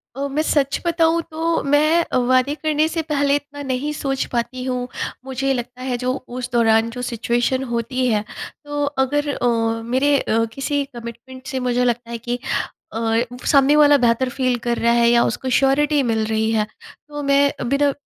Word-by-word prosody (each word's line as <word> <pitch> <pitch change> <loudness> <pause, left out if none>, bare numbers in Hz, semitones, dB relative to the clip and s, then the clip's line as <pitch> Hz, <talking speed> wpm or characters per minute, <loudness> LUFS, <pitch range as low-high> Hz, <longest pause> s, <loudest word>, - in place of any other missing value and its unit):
अ, 280 +1 -2
मैं 300 +2 0
सच 280 -3 +1
बताऊँ 335 0 +2
तो 330 +1 0
मैं 305 +4 +3
अ, - - -2
वादे 255 +3 +2
करने 310 0 +1
से 325 0 -2
पहले 285 -1 +2
इतना 290 0 -5
नहीं 265 +3 -2
सोच 270 -2 -2
पाती 250 +2 -2
हूँ, 250 -1 -2 0.4
मुझे 270 +1 -1
लगता 250 0 -5
है 255 -1 -2
जो 250 +1 -1 0.3
उस 250 0 -4
दौरान 225 -1 +3
जो 250 +1 -6
सिचुएशन 240 +2 0
होती 240 +2 -1
है। 215 -3 +1 0.4
तो 290 0 -2 0.2
अगर 290 +2 -1
अ, 245 -3 -1 0.4
मेरे 275 +4 +2
अ, 225 +1 +1
किसी 285 +1 -1
कमिटमेंट 240 +3 -9
से 260 0 -3
मुझे 250 0 0
लगता 235 -1 -1
है 235 - -3
कि 240 +2 -4 0.5
अ, 225 0 0 0.3
सामने 280 +1 +5
वाला 290 -1 +6
बेहतर 245 +1 +2
फ़ील 255 -1 0
कर 235 - +1
रहा 235 0 +2
है 235 0 +4
या 235 0 +4
उसको 260 +2 -2
श्योरिटी 285 +2 +3
मिल 220 -1 0
रही 220 0 0
है। 215 -1 +1 0.4
तो 295 -1 -6
मैं 280 0 +3 0.2
बिना 280 0 +2
260 Hz, 185 wpm, -21 LUFS, 240-285 Hz, 0.5 s, वाला